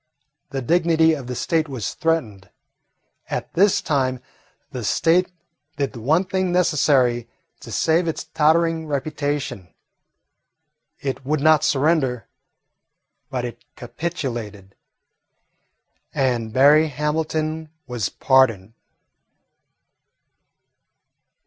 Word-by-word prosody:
The 135 -1 -4
dignity 165 +2 +3
of 140 -5 -5
the 125 - -4
State 160 +4 0
was 115 -5 -4
threatened. 115 - -2 0.8
At - - -4
this 200 +2 +3
time 130 -3 0 0.5
the 125 - -5
State 170 - +2 0.5
did 140 -2 -1
the 115 - -9
one 155 - +2
thing 185 -1 -1
necessary 135 -9 +2 0.3
to - - -11
save 165 +2 +1
its 160 - -3
tottering 160 +1 +1
reputation. 145 - -3 1.3
It 135 -1 -4
would 150 +3 0
not 155 +1 +4
surrender, 135 -4 +1 1.0
but 125 -2 -3
it 120 - -8
capitulated, 120 - -5 1.4
and 125 -5 0
Berry 145 +6 +5
Hamilton 155 +2 -2 0.2
was 120 -5 -3
pardoned. 115 -7 +2
145 Hz, 95 wpm, -22 LUFS, 125-160 Hz, 1.4 s, Berry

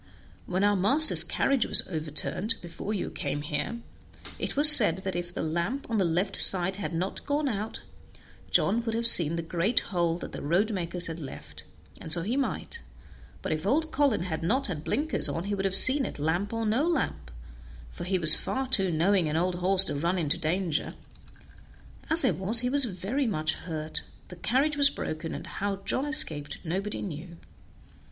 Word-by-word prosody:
When 185 +2 -2
our 205 0 +2
master's 270 +12 +5
carriage 270 -4 -1
was - - +7
overturned, 165 +6 -3
before 175 +4 -8
you 205 - -4
came 145 0 -5
here, 150 +10 -5 0.6
it - - -5
was 295 +1 +7
said 210 - +5
that 190 -1 -5
if 175 0 -5
the - - -6
lamp 170 - -4
on 220 - -1
the - - +1
left 180 +4 -2
side 190 0 +2
had 205 - -6
not 175 +3 -5
gone 290 +1 -1
out, 215 -3 -5 0.7
John 230 +4 +1
would 225 -1 -4
have 230 +1 -3
seen 170 -8 +5
the 170 - -5
great 175 +8 -1
hole 170 -2 -1
that - - -9
the - - -9
road 180 +9 -1
makers 175 -1 -3
had 165 0 -4
left; 75 - -11 0.3
and 160 - -7
so 170 0 +4
he 225 +7 -3
might, 280 - -3 0.6
but - - -4
if 155 +4 -4
old 315 +7 0
Colin 275 - 0
had 160 -3 -5
not 255 +12 -1
had 160 -6 -5
blinkers 305 - 0
on 165 - -4
he 200 +1 -5
would 195 -1 -3
have 195 -1 0
seen 265 +7 +5
it, - - -9
lamp 160 +7 -3
or 225 0 -4
no 240 +9 0
lamp, 170 - -3 0.6
for - - -9
he 185 +2 -2
was 155 -3 +8
far 265 0 -2
too 195 -8 +1
knowing 175 +1 0
an 150 - -3
old 180 +1 -2
horse 190 +2 +6
to - - -3
run 170 +6 -2
into 160 -2 -1
danger. 170 0 -3 1.1
As 320 -2 +7
it - - 0
was, 215 +5 +1
he 250 - -2
was 280 -1 +3
very 220 +7 -4
much 160 -6 -2
hurt, 155 -2 -6 0.3
the 180 - -11
carriage 275 - -1
was 285 -1 +5
broken, 160 - -7
and - - -9
how 195 +3 -5
John 260 +8 -2
escaped 150 - +2
nobody 195 +5 -4
knew." 170 -1 -9
190 Hz, 195 wpm, -26 LUFS, 165-230 Hz, 1.1 s, was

